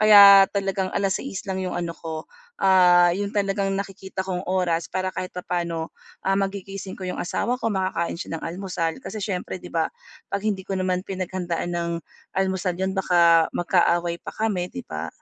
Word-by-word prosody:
kaya 200 -2 +10
talagang 195 -1 -1
6:00 195 +2 -1
lang 190 0 -2
yung 185 - -3
ano 170 -1 -2
ko, 160 -1 -6 0.3
ah, 180 -2 +6
yung 200 +2 -2
talagang 195 -1 0
nakikita 195 -1 -4
kong 180 -2 -2
oras 175 -3 0
para 185 0 -1
kahit 185 - -4
papaano, 170 -2 -3 0.3
ah, 195 - +3
magigising 195 0 -3
ko 185 - -5
yung 180 - -3
asawa 235 +7 -1
ko, 225 - +1
makakain 185 -4 -1
siya 165 - -4
ng - - -15
almusal, 170 -1 -3
kasi 215 -5 -6
siyempre 190 -3 -3
'di - - -9
ba 165 -1 +1 0.4
'pag 200 - -2
hindi 200 -3 -1
ko 195 - -2
naman 185 0 -1
pinaghandaan 185 -2 -3
ng 170 0 -2 0.5
almusal 190 -2 0
'yon 190 +1 -1
baka 170 -4 +5
magkaaway 175 -1 +2
pa - - -7
kami, 200 -5 -1
'di 85 - -6
ba? 80 +1 -4
185 Hz, 175 wpm, -24 LUFS, 175-195 Hz, 0.5 s, kaya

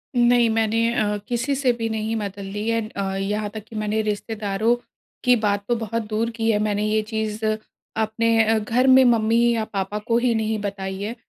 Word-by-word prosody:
नहीं 240 -1 +4
मैंने 225 +1 +1
अ, 210 -2 0
किसी 245 +4 -1
से 260 -2 +2
भी 230 -1 -3
नहीं 220 +1 -2
मदद 200 -2 -4
ली 205 +3 -5
है 230 -1 0
अ, 195 -2 -3
यहाँ 205 +2 -2
तक 215 -2 -6
कि 225 - -11
मैंने 215 +1 0
रिश्तेदारों 215 +1 -1 0.5
की 250 -1 +5
बात 205 -2 0
तो 240 - +2
बहुत 230 0 -2
दूर 225 +2 0
की 225 0 0
है 210 - +1
मैंने 210 0 0
ये 215 0 +2
चीज़ 220 0 -4
अपने 220 +1 0
अ, 220 0 +2
घर 240 +5 +1
में 260 0 +7
मम्मी 230 -1 +3
या 220 - 0
पापा 195 +2 -2
को 230 0 +3
ही 240 -1 +2
नहीं 220 -1 -1
बताई 195 -1 -4
है। 220 +4 -4
220 Hz, 200 wpm, -23 LUFS, 210-230 Hz, 0.5 s, में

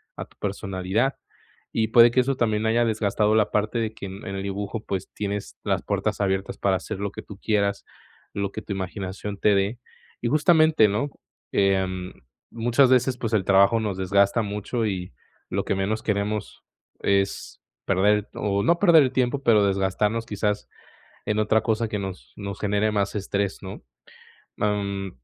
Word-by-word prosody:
a - - -6
tu - - -28
personalidad. 100 +5 -1 0.6
Y 110 -1 +1
puede 120 +1 +7
que 130 - +2
eso 135 +1 0
también 110 -3 0
haya 115 +1 +3
desgastado 110 -1 +1
la 110 - +3
parte 105 +3 0
de 110 -1 -2
que 105 - -8
en 95 +2 -9
el 95 0 -4
dibujo, 100 +2 -4
pues, 95 -1 -3
tienes 100 -1 -4
las - - 0
puertas - - -1
abiertas 95 0 -1
para 95 -1 +2
hacer 100 +1 -6
lo 100 -1 -2
que - - -8
tú 100 - -11
quieras, 100 -2 0 0.5
lo 100 -1 -2
que 110 - -6
tu 100 - -5
imaginación 95 +2 -5
te 105 -1 +4
dé. 100 +5 0 0.4
Y 120 - -1
justamente, 155 - +5
¿no?, 110 +9 -1 0.4
em, 95 -2 +1 0.4
muchas 120 +3 +3
veces, 125 0 +3
pues, 115 -2 -3
el 100 -4 +2
trabajo 100 +3 +5
nos 105 -4 -2
desgasta 100 +4 +2
mucho 105 +3 -2
y 90 -6 -3 0.4
lo - - -1
que - - 0
menos 100 +3 -1
queremos 105 0 -2 0.4
es 100 0 -1 0.2
perder 100 +2 +2
o 100 -1 -1
no 170 +1 +3
perder 170 -6 +7
el 130 -1 -1
tiempo, 130 +2 0
pero 105 -4 +5
desgastarnos 100 +3 0
quizás 105 -1 -2 0.6
en 105 - 0
otra 110 +1 +2
cosa 110 0 0
que 105 -1 -3
nos 95 -2 -7
nos 100 -1 -6
genere 105 +1 +1
más 100 -1 0
estrés, 100 0 -2
¿no? 95 +2 -8 0.7
Mm, 100 -2 -1
105 Hz, 170 wpm, -24 LUFS, 100-110 Hz, 0.7 s, puede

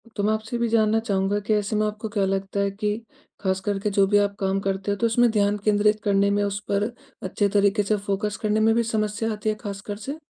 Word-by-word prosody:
तो 200 - -2
मैं 215 +1 +2
आपसे 220 +2 -4
ये - - -1
भी 235 - +2
जानना 220 -1 +3
चाहूँगा 200 -2 0
कि 205 +2 -1
ऐसे 210 0 0
में 215 0 +2
आपको 215 +1 -5
क्या 205 -2 0
लगता 195 +1 -2
है 200 0 +1
कि 210 +1 -2 0.4
ख़ास 190 -1 0
करके 205 0 0
जो 200 -1 +3
भी 205 +1 +4
आप 200 0 +1
काम 195 0 0
करते 195 0 -2
हो, 200 - -1
तो 235 - 0
उसमें 235 +1 +3
ध्यान 205 -1 +2
केंद्रित 210 0 +3
करने 200 -1 +3
में, 205 0 +1
उस 200 0 -2
पर 205 +3 0 0.3
अच्छे 200 +2 0
तरीके 205 +1 +2
से 210 +1 +1
फ़ोकस 200 +1 -2
करने 215 0 +1
में 220 +1 +4
भी 235 - +2
समस्या 220 0 -1
आती 210 +1 -2
है, 215 - 0
ख़ासकर 205 -1 -6
से? 270 +8 -6
205 Hz, 250 wpm, -24 LUFS, 200-215 Hz, 0.4 s, भी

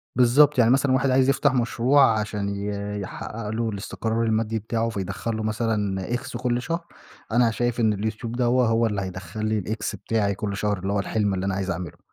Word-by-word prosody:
بالضبط، 130 +4 +5
يعني 115 0 +5
مثلًا 135 0 +3
واحد 130 +1 +2
عايز 130 +1 +4
يفتح 135 0 +3
مشروع، 120 0 +3
عشان 105 -1 -2
ي 100 +1 -3 0.3
يحقّق 105 +2 -6
له 115 +1 -1
الاستقرار 110 +2 -2
المادي 110 0 0
بتاعه، 115 +2 -1
فيدخُل 100 +2 -3
له 110 - -3
مثلًا 105 -4 -1
X 120 0 -5
كُلّ 125 -1 0
شهر، 165 +4 -3 0.5
أنا 120 0 +4
شايف 120 +1 -1
إن 110 -2 +3
اليوتيوب 110 +2 -3
دوّه، 125 0 +2
هو 115 +1 +2
اللي 100 -2 -2
هيدخل 95 +3 -5
لي 110 0 +1
الX 110 +3 -3
بتاعي 100 -3 -1
كُلّ 100 -1 -3
شهر، 105 -1 0
اللي 95 +2 -2
هو 100 - +1
الحلم 100 +1 0
اللي 95 0 -2
أنا 95 -1 0
عايز 95 -1 -2
أعمله. 85 -1 -6
110 Hz, 200 wpm, -24 LUFS, 100-120 Hz, 0.5 s, بالضبط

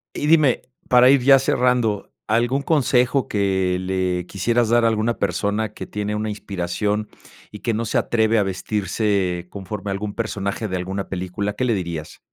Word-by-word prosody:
Y 145 - -2
dime, 155 -5 +4 0.3
para 125 +1 +7
ir 140 -2 +5
ya 135 0 +7
cerrando, 125 -5 +1 0.2
¿algún 120 +5 +1
consejo 135 -3 +2
que 95 -3 0
le 90 -1 -1
quisieras 115 +5 0
dar 120 0 +4
a - - +5
alguna 115 +1 0
persona 105 +1 -1
que - - -8
tiene 105 0 -3
una 105 +1 -2
inspiración 105 +1 -2 0.4
y 105 - -9
que 115 -2 -1
no 115 - -1
se - - -1
atreve 110 -1 +2
a 105 - +3
vestirse 95 -2 -1
conforme 100 +1 -6
a - - -1
algún 100 +1 -4
personaje 105 -1 -3
de 95 - -3
alguna 95 +2 -4
película? 95 +2 -3
¿Qué 130 +5 -1
le 120 - +2
dirías? 85 -5 -4
105 Hz, 175 wpm, -22 LUFS, 95-120 Hz, 0.4 s, para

